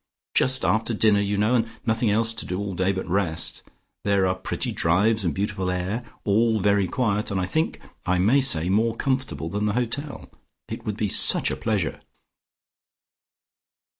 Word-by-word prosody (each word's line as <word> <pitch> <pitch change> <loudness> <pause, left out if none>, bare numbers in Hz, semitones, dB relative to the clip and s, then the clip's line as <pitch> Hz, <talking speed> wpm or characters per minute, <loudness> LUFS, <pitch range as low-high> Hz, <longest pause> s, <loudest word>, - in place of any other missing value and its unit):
Just 130 0 +3
after 110 +1 0
dinner, 105 -1 +3
you 100 0 -1
know, 105 +4 +2
and 115 -2 +2 0.2
nothing 110 0 +1
else 115 +2 +1
to 110 - -6
do 90 - -3
all 100 0 -4
day 95 +2 0
but 95 -1 -4
rest. 90 -3 0 0.4
There 100 -1 +2
are 90 - +1
pretty 95 0 -3
drives 100 +6 +1
and 85 - 0
beautiful 95 +1 -3
air. 90 +6 -2 0.2
All 110 +2 +2
very 100 -1 +2
quiet, 105 -2 -1
and 100 - -2
I 90 - -1
think 160 - -2 0.2
I 90 0 0
may 110 +10 +3
say 85 -11 +4
more 110 +4 +1
comfortable 130 - -2
than 105 +3 -2
the 105 - 0
hotel. 135 +4 -3 0.4
It - - -7
would 105 -1 -3
be 110 - -1
such - - +4
a - - -2
pleasure." - - -2
105 Hz, 175 wpm, -24 LUFS, 95-115 Hz, 0.4 s, say